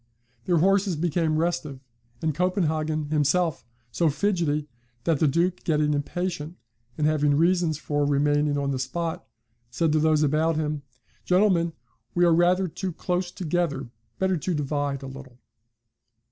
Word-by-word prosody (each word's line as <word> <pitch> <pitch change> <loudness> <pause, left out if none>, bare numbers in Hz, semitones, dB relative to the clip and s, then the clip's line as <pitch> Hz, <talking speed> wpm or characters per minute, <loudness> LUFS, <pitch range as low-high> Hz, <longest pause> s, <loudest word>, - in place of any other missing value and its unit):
Their 175 - +2
horses 195 +2 +3
became 160 0 0
restive 165 -4 -1 0.4
and 155 -1 +1
'Copenhagen' 155 -3 0
himself 155 +2 +1 0.3
so 165 +9 +1
fidgetty, 150 -3 0 0.4
that 160 -1 +1
the 155 - +3
Duke, 170 +5 0
getting 150 -2 +1
impatient, 165 +2 -3 0.4
and 150 - +1
having 150 -2 +2
reasons 170 -1 +2
for 145 -1 -1
remaining 145 +1 +2
on 140 -1 -1
the 130 - -2
spot, 165 +5 -3 0.5
said 155 +6 0
to 155 - +3
those 155 0 +3
about 155 +3 +2
him, 150 -1 -2 0.4
'Gentlemen 180 -3 +2 0.4
we 175 0 +4
are 170 - +5
rather 180 +3 +3
too 185 +3 -4
close 180 +2 -2
together 165 -7 -2 0.3
better 190 -1 +1
to 170 +3 -2
divide 145 -1 -2
a - - -6
little.' 135 -2 -11
155 Hz, 145 wpm, -25 LUFS, 145-175 Hz, 0.5 s, are